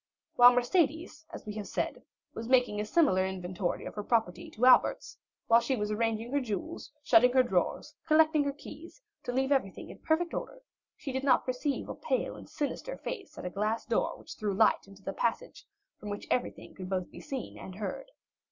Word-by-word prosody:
While 245 0 +9
Mercédès, 320 +4 0
as - - -9
we 210 - -5
have 210 - -5
said, - - -3 0.3
was 225 +1 -6
making 245 -5 +3
a - - -3
similar 215 - +3
inventory 185 -1 -3
of - - -6
her 210 - -4
property 205 -6 0
to 240 - 0
Albert's, 255 - +4 0.3
while 230 0 +6
she 265 +3 -1
was 210 -2 -2
arranging 225 +2 -1
her 285 0 +1
jewels, 255 +8 -5
shutting 250 -2 +6
her 260 -1 +6
drawers, 190 -7 -1
collecting 310 -1 +4
her 280 - 0
keys, 310 - -12 0.3
to - - -2
leave 265 +2 0
everything 260 -9 -1
in - - -13
perfect 335 +2 0
order, - - -6 0.3
she 295 -2 -5
did 265 +1 -3
not 265 -2 +3
perceive 255 +2 -2
a - - -4
pale - - -2
and - - -12
sinister 305 - -4
face 400 -6 -7
at - - -7
a 180 - -3
glass 215 +4 -1
door 230 - 0
which - - -10
threw 205 -2 -2
light 215 -1 +3
into 195 0 -16
the 195 - -4
passage, 240 - -2 0.3
from 210 - -7
which 205 0 -5
everything 250 - -2
could 185 -1 -8
be 190 - +1
both 180 - -8
seen 265 -3 -6
and 185 - -9
heard. - - -5
245 Hz, 200 wpm, -30 LUFS, 210-290 Hz, 0.3 s, While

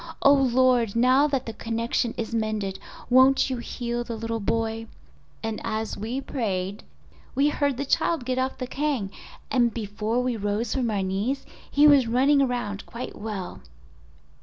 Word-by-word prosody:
Oh, 280 - +8
Lord 255 -4 +3
now 255 +5 +5
that 275 -3 -1
the 225 - -5
connection 230 +1 -1
is 230 0 -4
mended, 215 -4 -2 0.3
won't 260 +2 +5
you 255 - -1
heal 240 0 -3
the 235 -1 -5
little 225 +1 -3
boy?' 225 +1 -1 0.6
And 225 -1 -3
as 220 0 -2
we 230 +6 -3
prayed 200 -7 -3 0.5
we 280 +3 +4
heard 285 -3 0
the 280 - -2
child 310 0 +1
get 255 0 -1
off 260 +1 -1
the 255 - -3
kang, 260 -7 -2 0.4
and 240 -3 +3
before 215 +1 -2
we 250 -1 0
rose 210 +2 -1
from 250 -3 0
our 200 -3 0
knees 205 +9 -2 0.2
he 290 +1 +4
was 280 -5 +6
running 270 +5 +4
around 240 -6 -1
quite 240 +2 -7
well." 205 -4 -6
235 Hz, 160 wpm, -25 LUFS, 220-260 Hz, 0.6 s, Oh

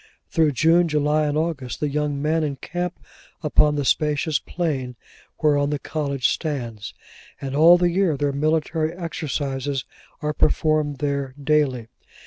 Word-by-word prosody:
Through 155 -3 +2
June, 165 +6 +4
July, 150 0 +1
and 145 0 -1
August, 155 -6 -2
the 150 - 0
young 145 0 -1
men 155 +2 +1
encamp 170 +5 -3 0.5
upon 150 0 +3
the 145 -1 -1
spacious 150 +2 +1
plain 140 -8 -3 0.5
whereon 145 -1 +3
the 145 - -1
college 140 -3 -1
stands; 115 - -4 0.4
and 135 0 -4
all 165 +4 +7
the 175 0 +2
year 175 -4 +1
their 145 0 0
military 155 +2 0
exercises 145 -6 -3 0.3
are 150 0 -2
performed 155 -1 +1
there, 140 -1 -2
daily. 140 -5 +1
150 Hz, 135 wpm, -23 LUFS, 140-155 Hz, 0.5 s, all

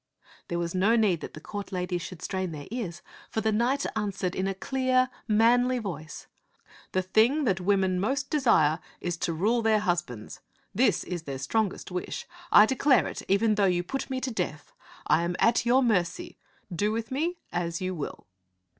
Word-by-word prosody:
There 170 - -2
was 170 -1 -2
no 195 +5 +3
need 205 -8 +2
that - - -8
the - - -8
court 205 +5 -7
ladies 180 -1 -2
should 180 -1 -8
strain 185 -3 -2
their 145 -2 -7
ears, 195 -9 -5 0.3
for - - -2
the 220 0 +1
knight 245 +6 +1
answered 200 -4 -2
in 190 0 -1
a 195 - -2
clear, 255 +3 +1 0.2
manly 245 +3 +4
voice, 160 -9 -6 0.3
" - - -25
The 185 - +1
thing 225 +10 +3
that 190 -7 +1
women 190 -1 +2
most 270 +8 -1
desire 220 - +3 0.2
is 175 -1 -2
to 170 - -1
rule 215 +9 +1
their 220 -1 +3
husbands. 175 - -2 0.3
This - - +2
is 175 -1 -4
their 140 -4 -6
strongest 190 +9 -1
wish. 180 0 -4 0.3
I 210 - +9
declare 265 +3 +3
it - - -5
even 215 +3 +3
though 205 -1 +2
you 180 -2 +2
put 270 +11 -4
me 260 -1 -2
to 255 - -2
death. 360 - -4 0.3
I - - +3
am 170 +1 -1
at 235 0 +3
your 260 +3 +5
mercy. 180 -7 0 0.4
Do 205 +5 +1
with 225 +1 -3
me 330 +7 -1
as 170 -1 -2
you 185 0 -2
will." 155 -5 -6
200 Hz, 190 wpm, -27 LUFS, 175-235 Hz, 0.4 s, I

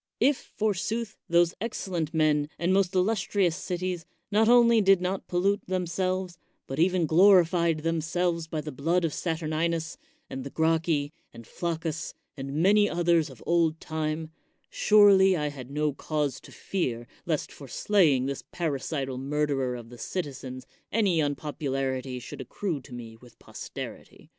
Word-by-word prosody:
If, 270 +3 +1
forsooth, 215 +2 -1
those 170 0 +4
excellent 180 -8 -3
men 150 -2 +2
and 175 +2 +1
most 190 -1 +2
illustrious 190 -2 +1
cities 180 -1 -3 0.3
not 220 +2 +4
only 235 -2 +6
did 195 -2 +5
not 185 +1 -3
pollute 195 +3 +1
themselves, 185 0 -2 0.3
but 135 +2 -5
even 180 0 +3
glorified 170 -1 +4
themselves 165 +1 0
by 160 -1 -3
the 150 0 -6
blood 165 +6 +1
of 155 - -2
Saturninus, 160 0 -2 0.3
and 135 - -6
the 140 - -6
Gracchi, 160 -1 +1 0.2
and 115 - -12
Flac 170 +3 -3
cus, 160 -1 -4 0.2
and 135 0 -6
many 205 +6 +4
others 170 -2 +2
of 130 -5 -13
old 165 -2 +2
time, 155 0 -3 0.4
surely 195 -3 +6
I 150 -1 -1
had 135 -3 -9
no 150 +1 0
cause 150 -1 -2
to - - -14
fear 120 -11 -3 0.2
lest 155 -4 -1
for 140 - -11
slaying 150 - +3
this 140 0 -4
parricidal 140 -4 -2
murderer 140 -2 -1
of 120 -2 -9
the 120 -1 -12
citizens 130 -5 -5 0.3
any 195 -7 +2
unpopularity 135 -3 -2
should 125 - -8
accrue 175 -9 -3
to 125 0 -13
me 115 -2 -9
with 120 +1 -18
posterity. - - -9
165 Hz, 150 wpm, -27 LUFS, 145-185 Hz, 0.4 s, only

